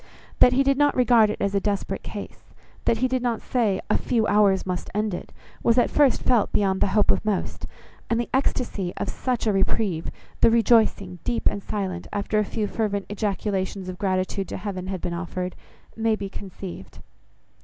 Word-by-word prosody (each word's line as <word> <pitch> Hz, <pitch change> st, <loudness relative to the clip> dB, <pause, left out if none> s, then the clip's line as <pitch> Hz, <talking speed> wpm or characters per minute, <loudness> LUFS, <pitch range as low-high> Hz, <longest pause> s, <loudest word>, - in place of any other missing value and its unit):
That 250 Hz, -, +7 dB
he 270 Hz, +2 st, +4 dB
did 275 Hz, 0 st, +2 dB
not 290 Hz, 0 st, +3 dB
regard 240 Hz, -3 st, +5 dB
it 210 Hz, -, -3 dB
as 200 Hz, 0 st, 0 dB
a 200 Hz, -, +3 dB
desperate 200 Hz, 0 st, -2 dB
case, -, -, -9 dB, 0.3 s
that 230 Hz, -, +3 dB
he -, -, +3 dB
did 255 Hz, 0 st, -1 dB
not 240 Hz, -2 st, 0 dB
say 220 Hz, -7 st, 0 dB
a -, -, +2 dB
few 230 Hz, -3 st, +1 dB
hours 200 Hz, -2 st, +3 dB
must 180 Hz, -1 st, -3 dB
end 210 Hz, -1 st, 0 dB
it, 175 Hz, -, -6 dB, 0.3 s
was 230 Hz, +1 st, +3 dB
at 245 Hz, -, +3 dB
first 285 Hz, -5 st, +3 dB
felt, 240 Hz, -5 st, +2 dB
beyond 190 Hz, -2 st, +1 dB
the -, -, +4 dB
hope 210 Hz, -, +5 dB
of -, -, 0 dB
most; 210 Hz, -3 st, -2 dB, 0.4 s
and 230 Hz, -, +1 dB
the 240 Hz, -, -1 dB
ecstasy 240 Hz, -8 st, -1 dB
of -, -, -2 dB
such 250 Hz, -3 st, -2 dB
a 215 Hz, -, +2 dB
reprieve, 195 Hz, -3 st, 0 dB, 0.3 s
the -, -, +6 dB
rejoicing, 220 Hz, -5 st, +3 dB
deep 235 Hz, -, -2 dB
and 200 Hz, -, +1 dB
silent, 190 Hz, -4 st, -4 dB
after 205 Hz, +1 st, 0 dB
a -, -, +3 dB
few 215 Hz, +1 st, -2 dB
fervent 205 Hz, -2 st, -2 dB
ejaculations 195 Hz, -2 st, -2 dB
of 180 Hz, -, -7 dB
gratitude 190 Hz, 0 st, -1 dB
to -, -, -5 dB
Heaven 185 Hz, -3 st, -5 dB
had 190 Hz, -2 st, -4 dB
been 175 Hz, -1 st, -3 dB
offered, 180 Hz, +1 st, -4 dB, 0.4 s
may 225 Hz, 0 st, +1 dB
be 200 Hz, -2 st, -5 dB
conceived. 190 Hz, -, -9 dB
205 Hz, 195 wpm, -24 LUFS, 190-230 Hz, 0.4 s, That